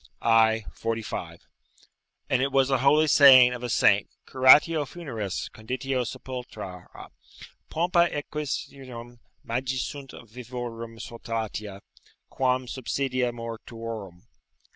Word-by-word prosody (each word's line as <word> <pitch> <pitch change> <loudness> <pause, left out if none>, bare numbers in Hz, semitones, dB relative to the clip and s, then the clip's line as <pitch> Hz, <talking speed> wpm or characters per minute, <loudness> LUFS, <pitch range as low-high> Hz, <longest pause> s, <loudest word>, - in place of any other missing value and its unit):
i. 110 -1 +4
45.] 115 -1 -5 0.9
and 130 -1 +1
it 135 +1 0
was 135 0 +2
a 135 - +2
holy 145 +4 +4
saying 130 -4 +8
of 125 - -7
a 125 - -4
saint, 100 -2 +3 0.2
"Curatio 145 +4 +5
funeris, 130 - -5
conditio 130 +3 -3
sepultura: 110 -10 -8 0.8
pompa 170 +1 +2
exequiarum, 135 -5 -6 0.2
magis 130 +2 -2
sunt 140 -2 -8
vivorum 115 -1 -7
solatia, 110 -4 -6 0.5
quam 130 0 0
subsidia 130 0 -2
mortuorum." 115 -5 -8
125 Hz, 100 wpm, -26 LUFS, 115-135 Hz, 0.9 s, saying